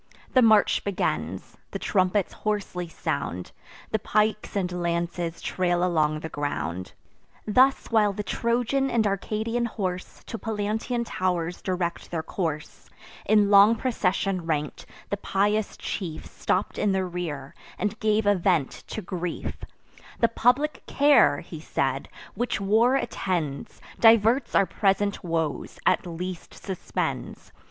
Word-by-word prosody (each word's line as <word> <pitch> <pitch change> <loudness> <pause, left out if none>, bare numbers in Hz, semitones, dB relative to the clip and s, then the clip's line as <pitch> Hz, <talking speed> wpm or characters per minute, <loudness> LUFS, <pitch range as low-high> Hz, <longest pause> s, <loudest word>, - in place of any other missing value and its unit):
The 255 - +6
march 220 -3 +5
begins: 200 -2 -2
the - - -4
trumpets 185 0 +1
hoarsely 200 -4 -2
sound; 90 - -3 0.4
The 220 - +1
pikes 215 +1 0
and 180 -2 -1
lances 170 0 -2
trail 175 -1 0
along 155 -4 +1
the 160 - -4
ground. 90 - -3 0.5
Thus 260 +6 +4
while 215 -2 +4
the 210 +1 -4
Trojan 245 +5 0
and 230 -3 +2
Arcadian 220 +4 -1
horse 185 -5 -4
To 225 - -6
Pallantean 220 +3 -2
tow'rs 180 -4 -1
direct 180 -2 -2
their 165 -2 -3
course, 160 -3 -4 0.4
In 210 -1 +4
long 205 +3 +8
procession 195 -6 -1
rank'd, 150 -2 -2 0.2
the 200 - 0
pious 205 +2 0
chief 165 -5 -5
Stopp'd 185 - -1
in 205 -2 +2
the 190 -1 +1
rear, 165 -6 -5 0.2
and 205 +1 -2
gave 215 0 +2
a 205 - +5
vent 175 -6 +1 0.2
to 215 - -5
grief: 175 -1 -4 0.6
"The 230 - +4
public 255 +6 +2
care," 285 +1 +5
he - - -9
said, - - -2 0.2
"which 245 -2 -1
war 220 +6 +3
attends, 170 - -2 0.2
Diverts 230 +3 +5
our 195 - +5
present 200 +1 0
woes, 165 -3 -2
at - - +2
least 175 +1 -6
suspends. 190 -3 -4
195 Hz, 130 wpm, -26 LUFS, 175-220 Hz, 0.6 s, long